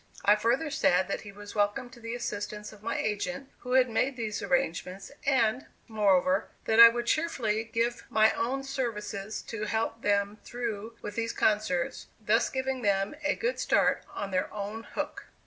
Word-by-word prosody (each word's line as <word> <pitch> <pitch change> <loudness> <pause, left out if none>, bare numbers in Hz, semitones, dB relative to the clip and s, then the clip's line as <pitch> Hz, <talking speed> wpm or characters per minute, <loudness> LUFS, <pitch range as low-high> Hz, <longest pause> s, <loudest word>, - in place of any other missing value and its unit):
I 205 - +7
further 240 +8 +1
said 185 - +3
that - - -2
he 205 - -10
was 205 +1 -10
welcome 205 +5 0
to 250 - -14
the 230 0 -5
assistance 210 -3 -5
of 210 - -16
my 230 +2 -2
agent 270 +6 -3
who 250 0 -4
had 260 -1 +6
made 250 +3 0
these 215 -3 -3
arrangements, 195 -6 -1 0.2
and, 250 -1 +2 0.2
moreover, 195 -3 +2 0.2
that 225 0 +2
I 230 0 +13
would 240 +1 -3
cheerfully 235 -8 0
give 230 +1 -1
my 220 0 +5
own 265 +4 -1
services 220 -6 -4
to 215 -2 -4
help 225 +1 -1
them 205 0 +1
through 230 -2 -5
with 205 - -5
these 230 0 -1
concerts, 210 -5 0
thus 220 +2 +2
giving 260 -1 -2
them 195 0 +1
a 295 - +2
good 485 +2 -1
start - - +2
"on 200 -1 -4
their 185 0 0
own 210 +2 -5
hook." - - -4
220 Hz, 175 wpm, -29 LUFS, 205-245 Hz, 0.2 s, I